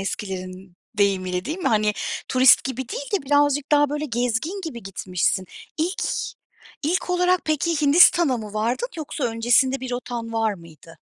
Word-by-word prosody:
eskilerin 185 -2 -6 0.2
deyimiyle, 185 -2 +1
değil 315 +6 -4
mi? 370 - 0
Hani, 215 -1 +2 0.4
turist 255 0 +5
gibi 260 -1 -4
değil - - -6
de - - -6
birazcık 290 0 +2
daha 290 -1 +4
böyle 295 +1 -2
gezgin 250 - -2
gibi 240 -8 -7
gitmişsin. 185 -1 -1 0.3
İlk 345 +5 -1 0.8
ilk 355 +4 -1
olarak 360 0 +2
peki, 310 +1 0
Hindistan'a 295 -1 +5
mı 215 -1 -8
vardın 235 - -1
yoksa 305 -3 -4
öncesinde 240 +3 +2
bir 260 - -5
rotan 240 -2 -5
var 225 -2 0
mıydı? 165 -2 -16
250 Hz, 150 wpm, -23 LUFS, 210-305 Hz, 0.8 s, turist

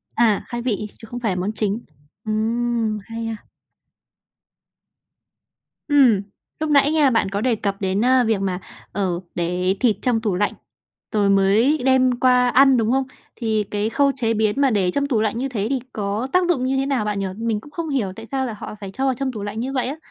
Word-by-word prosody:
À! 220 -3 +3
Khai 240 0 -4
vị, 215 -4 -2
chứ 225 - -11
không 245 - -4
phải 225 -5 0
là - - -1
món 185 +3 -1
chính. 215 +1 -2 0.4
Ừm, 225 0 -1
hay 230 0 -5
ha! 225 -2 -6 2.4
Ừm. 265 -9 +5 0.4
Lúc 310 0 -1
nãy 285 0 +4
nha, 305 -3 +4
bạn 225 -5 +1
có 200 +1 -2
đề 245 0 +2
cập 200 -2 -3
đến 195 +3 +1
a 255 0 +4
việc 220 -3 +1
mà, 185 -2 -1 0.3
ờ, 185 -4 -1 0.2
để 180 +2 0
thịt 235 -5 +3
trong 240 -3 +1
tủ 210 -5 0
lạnh, 205 +3 0 0.6
rồi 205 -2 +2
mới 200 +9 +4
đem 255 -2 +3
qua 250 -1 +4
ăn, 265 +1 +5
đúng 225 0 +1
không? 270 +1 +2 0.3
Thì 220 -3 0
cái 210 +1 0
khâu 280 +4 +2
chế 230 -4 0
biến 220 +4 +1
mà 275 - +4
để 195 -6 +1
trong 280 +7 0
tủ 235 -6 +1
lạnh 220 0 0
như 265 +3 -2
thế 215 -5 -2
thì 270 -1 0
có 210 +4 -2
tác 365 -1 +3
dụng 265 -8 +1
như 265 +1 0
thế 270 - +1
nào 270 -6 0
bạn 210 -1 -1
nhỉ? 195 - -1
Mình 225 -1 -1
cũng 290 - -15
không 330 +1 -4
hiểu 230 -10 -1
tại 225 +2 -10
sao 265 -1 0
là 235 - -4
họ 210 - -8
phải 195 - -7
cho 265 +8 -3
vào 265 - +2
trong 265 +1 -2
tủ 215 -4 -6
lạnh 205 +2 -4
như 260 +3 -3
vậy 255 -2 0
ấy? 280 +4 -4
225 Hz, 225 wpm, -21 LUFS, 205-260 Hz, 2.4 s, Ừm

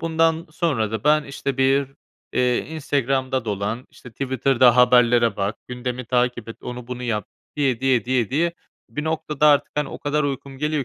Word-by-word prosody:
bundan 165 0 +1
sonra 140 - 0
da 110 -1 -4
ben, 150 0 +4
işte, 140 -1 -4
bir, 135 +1 +2 0.4
eee, 125 -1 +2
Instagram'da 135 -4 -1
dolan, 105 +3 -3
işte, 125 - -14
Twitter'da 130 -1 +2
haberlere 120 -1 +5
bak, 100 +2 -2
gündemi 125 0 -4
takip 125 -1 0
et, 115 - -7
onu 125 -1 -7
bunu 125 0 -6
yap 115 -4 -2 0.3
diye 130 -5 +1
diye, 130 -4 +2
diye 125 -3 0
diye 170 +5 +1 0.4
bir 150 - -4
noktada 155 -1 0
artık, 145 -1 +3
hani, 150 -2 -1
o - - -8
kadar 150 +1 0
uykum 135 -1 -4
geliyor 150 -1 -1
130 Hz, 170 wpm, -22 LUFS, 120-145 Hz, 0.4 s, haberlere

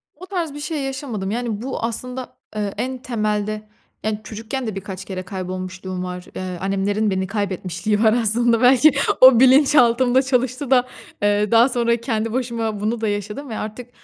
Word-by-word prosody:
O 365 +5 -11
tarz 345 -7 -3
bir 295 - -7
şey 295 -1 -3
yaşamadım. 260 -8 -4
Yani, 230 -2 -3
bu 260 -2 -4
aslında, 250 +2 -4 0.2
eee, 205 -2 -2
en 260 0 -2
temelde, 215 -3 -2 0.4
yani, 215 -1 -1
çocukken 225 +4 -5
de 210 - -4
birkaç 190 -1 -7
kere 185 -1 -5
kaybolmuşluğum 185 0 -5
var. 180 0 -6
Eee 185 -1 -4
annemlerin 200 +2 0
beni 190 0 -1
kaybetmişliği 200 +1 -1
var 220 0 +5
aslında. 235 0 +2
Belki 260 +4 +6 0.3
o 255 -2 +9
bilinçaltımda 260 -2 +5
çalıştı 260 +1 -1
da 255 -1 +4 0.3
eee, 205 +1 +2
daha 235 +3 +6
sonra 235 -1 +1
kendi 225 -2 -2
başıma 230 -4 -2
bunu 220 +2 -2
da 220 - 0
yaşadım 210 +7 -4
ve 220 - -4
artık 230 +3 -6
225 Hz, 165 wpm, -21 LUFS, 205-255 Hz, 0.4 s, o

